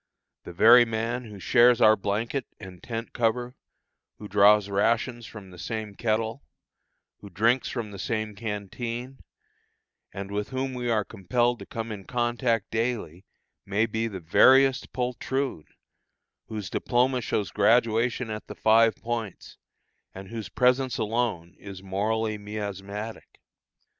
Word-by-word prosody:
The - - -7
very 115 +7 +7
man 115 +2 -3
who 105 -3 -10
shares 120 +3 +5
our 110 0 +6
blanket 110 +7 -2
and 90 -2 -11
tent 115 -1 -6
cover, 120 +2 -1 0.6
who 105 - -9
draws 105 0 +5
rations 115 +4 0
from 100 -4 -11
the 90 - -13
same 110 +3 -5
kettle, 110 +4 -1 0.8
who 100 - -11
drinks 115 +7 +1
from 115 -4 -4
the 100 - -9
same 110 0 -2
canteen, 115 +5 -5 0.9
and 100 +1 -7
with 105 0 -3
whom 130 0 -3
we 125 -1 -3
are 110 -3 +1
compelled 120 +4 0
to - - -10
come 115 -4 -5
in 100 -3 -7
contact 120 -2 -1
daily, 110 -7 -3 0.4
may 100 +3 +1
be 110 0 -2
the 100 -4 -6
veriest 130 +10 +4
poltroon, 125 - -2 0.8
whose 105 -5 -6
diploma 125 +1 +1
shows 105 -2 -2
graduation 115 0 +2
at 105 0 -6
the - - -8
Five 115 0 +4
Points, 115 -4 -6 0.6
and 95 0 -9
whose 110 -5 -6
presence 125 +4 +2
alone 105 -6 -2
is 100 -1 -10
morally 105 +3 -1
miasmatic. 105 +1 -6
110 Hz, 135 wpm, -26 LUFS, 100-120 Hz, 0.9 s, very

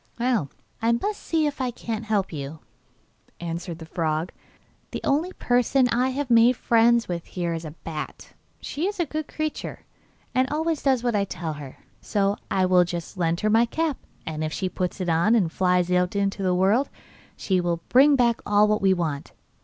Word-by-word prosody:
'Well, 240 - +1 0.3
I 230 +1 +3
must 410 - -2
see 320 -2 +1
if 285 -2 -2
I 255 - 0
can't 225 -2 -5
help 205 -4 0
you,' 145 +1 -5 0.8
answered 170 0 -5
the 165 - -9
frog. 160 0 -1 0.6
'The - - -5
only 315 +6 +1
person 250 +1 +2
I 250 +3 +2
have 265 -1 -3
made 235 +2 +6
friends 235 0 +3
with 170 -2 -3
here 175 -2 -3
is 165 0 -5
a 155 0 -8
bat. 155 -2 -7 0.3
She 320 +6 -3
is 410 -1 -4
a 345 - +2
good 310 0 -4
creature, 310 -1 -4 0.5
and 255 +1 +2
always 315 +1 -1
does 265 -4 +2
what 240 -3 +1
I 200 - +2
tell 165 -4 -4
her, 145 -3 -9 0.2
so 200 -1 +1
I 190 -1 +2
will 180 -1 +5
just 175 0 -5
lend 170 -2 0
her 215 - +2
my 230 +2 +4
cap, 315 +2 -1 0.3
and 155 -1 -3
if 155 - -2
she 185 +3 -2
puts 180 +1 -3
it 180 - -2
on, 170 +7 +3
and 185 -8 +2
flies 180 -1 +2
into 195 +2 +1
the 185 -1 +1
world, 200 +9 +3 0.5
she 185 -2 +1
will 170 -1 -2
bring 280 +3 +6
back 235 -3 +2
all 210 +1 +4
we 190 -1 +3
want. 155 -5 -3
200 Hz, 190 wpm, -25 LUFS, 175-250 Hz, 0.8 s, made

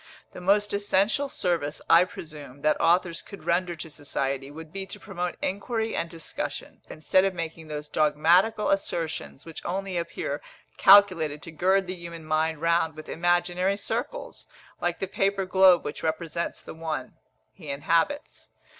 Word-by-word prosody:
The - - -9
most 205 +3 +2
essential 205 +7 +2
service, 170 - -1
I 170 +2 +7
presume, 150 -7 -10
that 155 - +2
authors 170 0 +2
could 200 - -12
render 175 0 +1
to 165 - -8
society, 140 -2 -3
would 160 +2 -10
be 195 0 -5
to - - -8
promote 180 -3 -4
inquiry 220 +3 -1
and 170 - -2
discussion, 165 -2 -5
instead 170 +4 +2
of 195 -1 0
making 165 -1 -5
those 150 -1 -5
dogmatical 170 +9 +3
assertions 165 -7 -2
which 165 -1 -8
only 190 +1 -2
appear 155 -3 -4 0.4
calculated 185 -7 +6
to 170 - -7
gird 190 +5 +2
the 185 - -4
human 170 -2 -9
mind 155 0 0
round 165 -1 +2
with 155 - -10
imaginary 175 +3 +1
circles, - - -4 0.3
like 175 0 0
the - - -2
paper 195 +1 0
globe 185 -1 +5
which 145 - -5
represents 165 +1 -3
the - - -8
one 160 -1 -4 0.4
he 160 -6 -11
inhabits. 165 - 0
170 Hz, 155 wpm, -26 LUFS, 155-190 Hz, 0.4 s, I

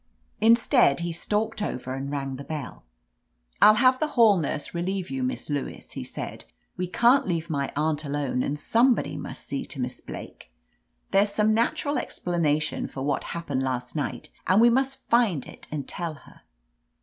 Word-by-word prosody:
Instead, 230 - +4
he 170 0 -2
stalked 210 +6 -1
over 130 -9 -3
and 135 +1 -4
rang 135 -2 -3
the 140 - -7
bell. 150 -4 -6 0.8
I'll 215 - +9
have 255 +2 +4
the 310 - +1
hall 225 -4 +7
nurse 150 -1 -3
relieve 185 +2 -2
you. 270 -1 -2
Miss 255 0 -2
Lewis," 145 -2 -4
he - - -5
said. - - -7 0.3
"We 180 - -2
can't 240 +7 +4
leave 165 -2 -2
my 140 -2 -1
aunt 155 +1 0
alone, 140 -3 -1
and 145 +3 -1
somebody 235 - +2
must 145 - -7
see 140 - -3
to - - -7
Miss 125 0 -4
Blake. - - -10 0.6
There's 200 +1 +4
some 215 +1 +2
natural 245 +6 +1
explanation 155 -4 -1
for 135 - -6
what 145 - -1
happened 145 -6 -3
last 130 0 -3
night, 145 - -3 0.2
and 185 +3 +5
we 235 +1 +7
must 265 +2 0
find 225 - +3
it - - -12
and 145 -3 -4
tell 170 -3 -4
her." - - -18
170 Hz, 175 wpm, -26 LUFS, 145-225 Hz, 0.8 s, I'll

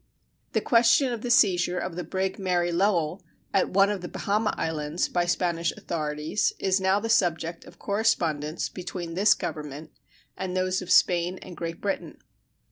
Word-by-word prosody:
The - - +2
question 235 +2 +4
of 230 - -5
the 245 - -4
seizure 180 -6 +3
of 175 -1 -3
the 180 - -4
brig 190 +4 -2
Mary 175 -2 0
Lowell 175 -1 +1 0.3
at 190 - +2
one 195 +2 +4
of 200 -3 -3
the 175 - -5
Bahama 210 +2 0
Islands 155 +1 -1
by 175 -1 0
Spanish 170 -2 0
authorities 155 +3 -2
is 190 0 +1
now 190 +1 +3
the 225 - -4
subject 170 -6 0
of - - -15
correspondence 170 -8 0
between 175 -2 -6
this 200 +5 +4
Government 150 +1 -6 0.4
and 185 -1 -3
those 185 +1 0
of 185 - -8
Spain 175 0 +3
and 180 - -10
Great 165 +1 -5
Britain. 200 -1 -3
180 Hz, 165 wpm, -26 LUFS, 165-195 Hz, 0.4 s, question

